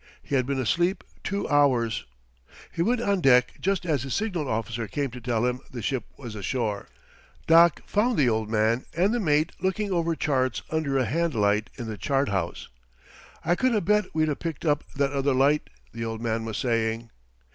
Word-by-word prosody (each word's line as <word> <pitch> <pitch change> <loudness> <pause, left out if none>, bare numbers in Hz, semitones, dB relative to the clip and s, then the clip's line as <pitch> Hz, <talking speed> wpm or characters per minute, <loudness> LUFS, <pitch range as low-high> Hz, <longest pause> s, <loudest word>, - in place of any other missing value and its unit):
He - - -8
had 130 -2 +2
been 140 -1 -1
asleep 175 - +1 0.2
two 200 +1 -2
hours. 125 -6 +2 0.7
He 165 - -3
went 235 +6 +2
on 200 -5 +1
deck 125 -4 +5
just 195 -1 0
as 150 -7 +1
his 130 -1 -3
signal 185 -9 -1
officer 115 +1 -2
came 140 +4 -2
to 125 +1 -9
tell 120 0 0
him 125 0 0
the 120 -4 -7
ship 125 0 -1
was 120 -5 -8
ashore. 105 0 -2 0.6
Doc 165 0 +6
found 225 +3 +1
the 140 - +4
old 110 -2 0
man 110 +3 +1
and 195 +6 +3
the 240 - +1
mate 155 -4 +2
looking 195 +3 -1
over 170 -2 +1
charts 130 -5 0
under 155 -4 0
a 130 - +2
hand 165 +5 0
light 105 0 +2
in 120 - -6
the 110 -2 -6
chart 135 -1 +1
house. 95 -4 -2 0.8
"I 175 - +3
could 250 +6 +2
'a' 210 - +2
bet 210 +3 +2
we'd 155 0 +2
'a' 145 - 0
picked 165 0 -5
up 150 -2 +2
that 140 -1 +1
other 140 -1 +1
light," 140 +3 +2 0.2
the 115 0 -4
old 115 -1 -4
man 115 -1 -2
was 110 -2 -4
saying. 115 -1 -1
135 Hz, 200 wpm, -26 LUFS, 115-170 Hz, 0.8 s, Doc